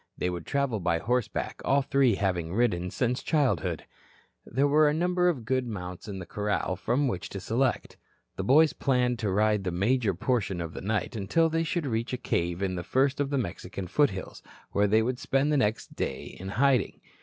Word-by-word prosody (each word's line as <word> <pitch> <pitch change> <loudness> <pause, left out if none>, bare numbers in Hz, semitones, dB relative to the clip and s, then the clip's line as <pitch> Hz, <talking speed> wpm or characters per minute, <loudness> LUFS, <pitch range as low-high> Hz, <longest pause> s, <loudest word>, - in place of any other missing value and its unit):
They 90 - -1
would 90 -1 -6
travel 140 -6 0
by 85 -2 +1
horseback, 125 +6 -2
all 140 +1 +3
three 130 -5 +3
having 90 -3 -1
ridden 90 -7 +1
since 125 +5 -1
childhood. 125 - 0 0.6
There 135 +5 +2
were 150 +1 +5
a 150 - 0
number 180 +2 +2
of 130 -10 -3
good 130 +1 0
mounts 90 -3 -6
in 100 -2 -5
the 95 - -6
corral 105 -1 -1
from 130 +9 0
which 95 -7 -3
to 100 - -6
select. 120 +7 -1 0.4
The 95 - -3
boys 150 +8 +5
planned 125 -3 +1
to 105 - -1
ride 105 +1 +2
the 95 - -1
major 100 +3 +1
portion 100 -3 -1
of 85 -1 -5
the - - -6
night 105 +3 -2
until 115 +11 +2
they 165 +1 0
should 165 0 -2
reach 115 -1 -2
a - - 0
cave 85 -6 -1
in 95 -1 0
the 90 -1 -4
first 135 +5 +1
of 140 -1 0
the 140 - 0
Mexican 95 -4 -4
foothills, 95 -2 0 0.3
where 100 +1 +2
they 110 +2 +3
would 125 +2 -2
spend 135 +2 +1
the 150 - +3
next 110 -4 -1
day 65 - -4
in 95 +1 -6
hiding. 130 +1 +2
115 Hz, 200 wpm, -28 LUFS, 95-135 Hz, 0.6 s, were